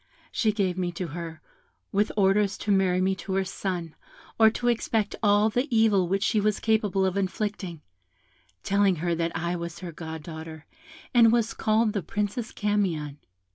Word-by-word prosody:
She 220 Hz, -3 st, +2 dB
gave 190 Hz, -3 st, -1 dB
me 180 Hz, -1 st, -1 dB
to 175 Hz, 0 st, -4 dB
her, 165 Hz, 0 st, -7 dB, 0.5 s
with 205 Hz, +1 st, +1 dB
orders 200 Hz, 0 st, +3 dB
to 210 Hz, -, -2 dB
marry 185 Hz, -2 st, +3 dB
me 190 Hz, +1 st, +2 dB
to 190 Hz, +2 st, -5 dB
her 195 Hz, -, +2 dB
son, 180 Hz, -4 st, -4 dB, 0.5 s
or 220 Hz, -1 st, +8 dB
to 240 Hz, +2 st, -3 dB
expect 225 Hz, -3 st, 0 dB
all 210 Hz, 0 st, +4 dB
the 245 Hz, +5 st, 0 dB
evil 220 Hz, -6 st, +3 dB
which 195 Hz, +2 st, 0 dB
she 215 Hz, -, +2 dB
was 210 Hz, 0 st, +1 dB
capable 210 Hz, -3 st, +1 dB
of 190 Hz, +1 st, -1 dB
inflicting, 190 Hz, -3 st, -3 dB, 0.8 s
telling 200 Hz, -1 st, +3 dB
her 170 Hz, +2 st, -1 dB
that 165 Hz, 0 st, -1 dB
I 170 Hz, +2 st, -2 dB
was 170 Hz, -1 st, -5 dB
her 175 Hz, -2 st, -6 dB
goddaughter, 160 Hz, -1 st, -8 dB, 0.5 s
and 230 Hz, -2 st, +6 dB
was 230 Hz, -1 st, +1 dB
called 215 Hz, 0 st, +1 dB
the 200 Hz, -, -1 dB
Princess 210 Hz, +7 st, -3 dB
Camion. 175 Hz, -9 st, -1 dB
195 Hz, 170 wpm, -26 LUFS, 170-210 Hz, 0.8 s, or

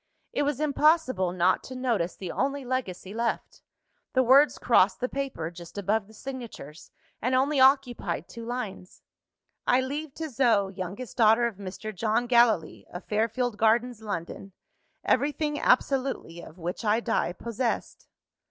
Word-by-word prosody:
It -, -, 0 dB
was 290 Hz, -2 st, 0 dB
impossible 300 Hz, -, +2 dB
not 180 Hz, +1 st, +2 dB
to 255 Hz, -, -8 dB
notice 235 Hz, -9 st, -1 dB
the 185 Hz, -3 st, -6 dB
only 275 Hz, +1 st, -2 dB
legacy 205 Hz, -7 st, -4 dB
left; 230 Hz, +1 st, -3 dB, 0.5 s
the 260 Hz, -, +4 dB
words 275 Hz, +4 st, +5 dB
crossed 195 Hz, -5 st, +3 dB
the 250 Hz, -, 0 dB
paper, 265 Hz, -13 st, -4 dB
just 170 Hz, +2 st, -12 dB
above 205 Hz, +1 st, 0 dB
the 220 Hz, -, -17 dB
signatures, 230 Hz, -, -9 dB, 0.3 s
and 255 Hz, +2 st, +1 dB
only 275 Hz, +2 st, +2 dB
occupied 255 Hz, -, +2 dB
two 230 Hz, -, -9 dB
lines: 230 Hz, -6 st, -6 dB, 0.6 s
"I 250 Hz, -, +5 dB
leave 285 Hz, +2 st, -5 dB
to 320 Hz, -, -4 dB
Zoe, 220 Hz, -6 st, +2 dB
youngest 190 Hz, +7 st, -6 dB
daughter 225 Hz, +1 st, +5 dB
of 230 Hz, -5 st, -3 dB
Mr. 205 Hz, +2 st, -7 dB
John 220 Hz, +4 st, 0 dB
Gallilee, 235 Hz, -9 st, +2 dB
of 175 Hz, -, -8 dB
Fairfield 225 Hz, +2 st, -1 dB
Gardens, 230 Hz, +1 st, +2 dB
London, 195 Hz, -1 st, -6 dB, 0.5 s
everything 295 Hz, +2 st, 0 dB
absolutely 255 Hz, -10 st, +1 dB
of 165 Hz, -, -13 dB
which 175 Hz, +5 st, -5 dB
I 215 Hz, +1 st, +2 dB
die 230 Hz, -6 st, 0 dB
possessed." 235 Hz, +4 st, -3 dB
235 Hz, 145 wpm, -27 LUFS, 195-260 Hz, 0.6 s, words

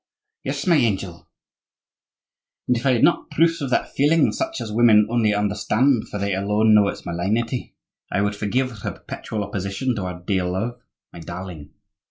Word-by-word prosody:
"Yes, -, -, -3 dB
my 170 Hz, -3 st, +4 dB
angel; 95 Hz, -, -1 dB, 1.4 s
and 125 Hz, -, +3 dB
if 120 Hz, +3 st, -1 dB
I 130 Hz, -, +4 dB
had 120 Hz, -, +1 dB
not 170 Hz, -, +3 dB
proofs 165 Hz, +2 st, +2 dB
of 140 Hz, -, -2 dB
that -, -, 0 dB
feeling 150 Hz, +2 st, +3 dB
such 330 Hz, 0 st, -3 dB
as 105 Hz, -, -5 dB
women 110 Hz, -1 st, +5 dB
only 115 Hz, -3 st, +2 dB
understand, 105 Hz, +5 st, +1 dB
for -, -, -4 dB
they 100 Hz, -1 st, -1 dB
alone 105 Hz, +3 st, +2 dB
know 105 Hz, -1 st, +6 dB
its -, -, -5 dB
malignity, 110 Hz, +8 st, -2 dB, 0.4 s
I 100 Hz, -, +1 dB
would 100 Hz, 0 st, 0 dB
forgive 115 Hz, +3 st, -1 dB
her -, -, -3 dB
perpetual 105 Hz, -2 st, -6 dB
opposition 100 Hz, +6 st, -2 dB
to 95 Hz, -, -3 dB
our 90 Hz, -1 st, -5 dB
dear 90 Hz, 0 st, -1 dB
love, 110 Hz, +7 st, -3 dB, 0.3 s
my -, -, -10 dB
darling. 85 Hz, -2 st, -8 dB
105 Hz, 175 wpm, -22 LUFS, 100-125 Hz, 1.4 s, know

